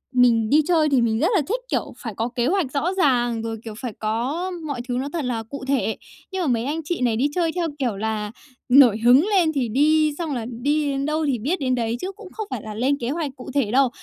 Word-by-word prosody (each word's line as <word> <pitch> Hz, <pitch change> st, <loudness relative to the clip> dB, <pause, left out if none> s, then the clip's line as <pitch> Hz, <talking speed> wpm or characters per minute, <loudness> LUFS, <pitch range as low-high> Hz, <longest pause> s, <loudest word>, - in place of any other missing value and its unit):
mình 230 Hz, -3 st, +4 dB
đi 305 Hz, +2 st, +5 dB
chơi 320 Hz, -4 st, +3 dB
thì 265 Hz, -3 st, +3 dB
mình 225 Hz, -1 st, +1 dB
rất 330 Hz, -, +3 dB
là 340 Hz, -, +4 dB
thích, 480 Hz, +4 st, -1 dB
kiểu, -, -, -2 dB
phải 225 Hz, -4 st, -6 dB
có 230 Hz, +2 st, -2 dB
kế 240 Hz, +1 st, +1 dB
hoạch 345 Hz, -7 st, 0 dB
rõ 330 Hz, +7 st, 0 dB
ràng, 240 Hz, -7 st, +2 dB
rồi, 225 Hz, 0 st, -4 dB
kiểu, 220 Hz, -2 st, -7 dB
phải 245 Hz, -5 st, -5 dB
có 255 Hz, +12 st, -2 dB
mọi 275 Hz, -5 st, -3 dB
thứ 245 Hz, -, -2 dB
nó 270 Hz, +2 st, -2 dB
thật 315 Hz, -6 st, -2 dB
là 230 Hz, -3 st, -2 dB
cụ 275 Hz, +4 st, -8 dB
thể. 265 Hz, -5 st, 0 dB, 0.3 s
Nhưng 380 Hz, -1 st, -2 dB
mà 325 Hz, -, 0 dB
mấy 235 Hz, -1 st, +1 dB
anh 315 Hz, +3 st, -2 dB
chị 335 Hz, -2 st, -3 dB
này 235 Hz, -3 st, +2 dB
đi 265 Hz, +6 st, +2 dB
chơi 335 Hz, -2 st, +1 dB
theo 345 Hz, -2 st, 0 dB
kiểu 235 Hz, -7 st, -1 dB
là 215 Hz, 0 st, -2 dB, 0.4 s
nổi 245 Hz, -5 st, +7 dB
hứng 260 Hz, +8 st, +7 dB
lên 365 Hz, -6 st, +3 dB
thì 250 Hz, -5 st, -1 dB
đi, 305 Hz, +4 st, +3 dB
xong 325 Hz, -5 st, -3 dB
là 230 Hz, -, -3 dB, 0.2 s
đi 290 Hz, +1 st, +1 dB
đến 275 Hz, 0 st, -2 dB
đâu 310 Hz, +1 st, 0 dB
thì 265 Hz, -6 st, 0 dB
biết 305 Hz, -, -1 dB
đến 255 Hz, -2 st, +1 dB
đấy, 230 Hz, -1 st, -1 dB
chứ 380 Hz, -, -3 dB
cũng 395 Hz, -1 st, -12 dB
không 435 Hz, -2 st, -5 dB
phải 250 Hz, -4 st, -4 dB
là 215 Hz, -1 st, -7 dB
lên 265 Hz, +6 st, +1 dB
kế 235 Hz, -, -3 dB
hoạch 300 Hz, -2 st, -2 dB
cụ 255 Hz, -, -10 dB
thể 255 Hz, -7 st, +1 dB
đâu. 265 Hz, 0 st, +4 dB
270 Hz, 265 wpm, -23 LUFS, 235-310 Hz, 0.4 s, nổi